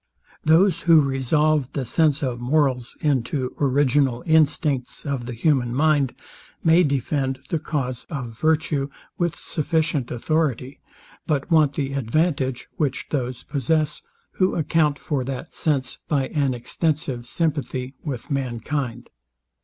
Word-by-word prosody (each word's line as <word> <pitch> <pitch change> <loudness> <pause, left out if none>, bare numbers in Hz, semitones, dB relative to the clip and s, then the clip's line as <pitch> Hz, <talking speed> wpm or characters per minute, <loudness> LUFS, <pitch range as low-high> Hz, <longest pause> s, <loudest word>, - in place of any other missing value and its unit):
Those 165 +3 +4
who 165 -1 +9
resolve 140 +1 +1
the 135 - -2
sense 155 +3 +2
of 125 -3 -2
morals 130 -2 +1
into 130 -2 0
original 135 -2 +2
instincts 150 -4 +1
of 135 -4 -3
the 125 - -4
human 120 -1 +1
mind, 145 -3 +2 0.5
may 165 +2 +6
defend 140 -2 0
the 165 - +1
cause 135 -5 -3
of 125 -7 -5
virtue 155 -1 +1 0.3
with 175 -2 0
sufficient 155 -4 -1
authority; 135 0 -1 0.5
but 145 0 -1
want 155 -3 +5
the 140 -1 -2
advantage, 135 0 0
which 140 -4 -1
those 125 -4 -2
possess, 150 +2 0 0.4
who 185 0 +2
account 155 -2 +2
for 140 -2 -2
that 135 +4 -6
sense 135 -5 -1
by 140 -5 0
an 140 -4 0
extensive 130 0 -2
sympathy 140 -4 -2
with 140 0 -5
mankind. 125 -1 -2
140 Hz, 125 wpm, -23 LUFS, 130-155 Hz, 0.5 s, who